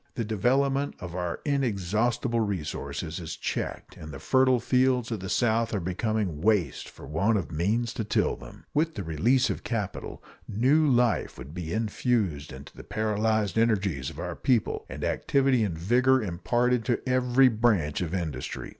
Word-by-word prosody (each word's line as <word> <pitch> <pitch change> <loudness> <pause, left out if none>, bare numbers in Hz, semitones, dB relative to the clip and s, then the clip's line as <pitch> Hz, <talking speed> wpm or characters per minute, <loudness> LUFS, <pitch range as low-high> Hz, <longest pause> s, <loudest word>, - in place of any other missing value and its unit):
The 115 - -2
development 135 +6 +1
of 90 -3 -7
our 90 -1 -3
inexhaustible 120 - 0
resources 80 -5 -3
is 85 -3 -6
checked, - - -4
and 75 - -9
the 70 - -7
fertile 130 - +3
fields 125 -1 +2
of 110 - -2
the 95 +1 -6
South 115 0 +1
are - - 0
becoming 95 -2 -2
waste 95 - +1
for - - -13
want 100 +10 +1
of 95 - -4
means 110 +9 0
to 115 - -3
till 105 - +1
them. - - -13
With 160 +2 +1
the 100 - -4
release 105 - +2
of - - -5
capital, 105 -5 -4 0.2
new 135 +9 +3
life 120 -2 +2
would 70 +5 -9
be 85 -2 -5
infused 105 - -1
into 65 +1 -11
the - - -10
paralyzed 110 0 0
energies 100 - +1
of - - -12
our - - -4
people 120 -5 0
and - - -6
activity 135 -4 +2
and 90 -6 -2
vigor 125 +9 +3
imparted 120 +7 0
to 120 +1 -1
every 130 +1 +4
branch 105 -11 +1
of 85 -3 -2
industry. 85 -7 -4
110 Hz, 165 wpm, -27 LUFS, 90-125 Hz, 0.2 s, every